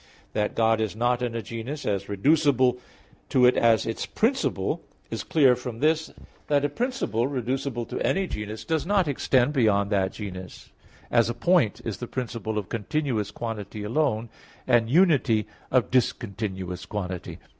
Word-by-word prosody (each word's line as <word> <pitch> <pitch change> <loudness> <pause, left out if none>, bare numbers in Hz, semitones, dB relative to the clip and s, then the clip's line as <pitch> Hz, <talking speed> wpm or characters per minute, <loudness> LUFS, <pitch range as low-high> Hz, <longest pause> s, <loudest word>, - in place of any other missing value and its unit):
That 105 0 -1
God 115 -1 +3
is 110 -1 -2
not 120 +2 +1
in 120 -2 -2
a 115 - -3
genus, 125 +6 -6
as 100 -1 -1
reducible 130 +2 +3 0.5
to 125 -2 +4
it 125 - +5
as 115 -2 +4
its 115 - -3
principle, 255 +5 0 0.3
is - - -3
clear 135 -6 +4
from 125 -2 -6
this, 155 +4 +1 0.4
that 145 -1 +2
a - - +1
principle 230 - -1
reducible 130 -2 -2
to - - -5
any 195 0 +1
genus 105 - -6
does 160 +2 0
not 195 -2 +2
extend 135 -1 +2
beyond 105 -6 +2
that 95 -2 +1
genus; 95 -4 -8 0.4
as, 115 -1 +4
a 120 - -2
point 140 - +2
is 110 - -3
the 120 - -6
principle 115 -4 -4
of 105 - -2
continuous 115 -1 -1
quantity 105 -2 -5
alone; 115 -1 0 0.4
and 115 -2 +3
unity, 140 - +4 0.2
of 125 -5 +2
discontinuous 100 -6 -1
quantity. 90 -4 -5
120 Hz, 155 wpm, -26 LUFS, 105-140 Hz, 0.5 s, it